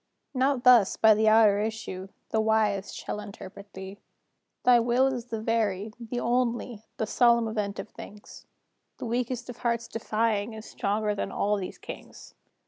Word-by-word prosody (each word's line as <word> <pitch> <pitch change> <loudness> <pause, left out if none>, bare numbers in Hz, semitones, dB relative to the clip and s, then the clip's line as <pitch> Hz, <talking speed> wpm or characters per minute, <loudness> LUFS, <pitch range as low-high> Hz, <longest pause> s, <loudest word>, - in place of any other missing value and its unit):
Not 260 -1 +1
thus, 240 -6 +6
by 220 -1 +7
the 220 +1 +2
outer 215 -2 +5
issue, 210 -3 -4 0.2
The 220 - +1
Wise 215 -3 +1
shall - - -5
interpret 200 -1 -10
thee. 190 +1 -8 0.6
"Thy 245 -1 +6
will 240 +3 +3
is 255 -3 -1
the 225 -2 -4
very, 215 -2 -1
the 240 +1 -4
only, 240 -2 -1 0.2
The 220 - 0
solemn 235 +1 +3
event 210 -2 -3
of 195 +3 -6
things; 205 0 -12 0.5
The - - -6
weakest 240 +1 -2
of 245 -2 -8
hearts 235 -1 -1
defying 220 -1 -1
Is 220 0 -9
stronger 210 +1 -1
than 205 - -3
all 210 +1 +1
these 190 -3 -5
Kings. - - -10
220 Hz, 160 wpm, -27 LUFS, 205-235 Hz, 0.6 s, by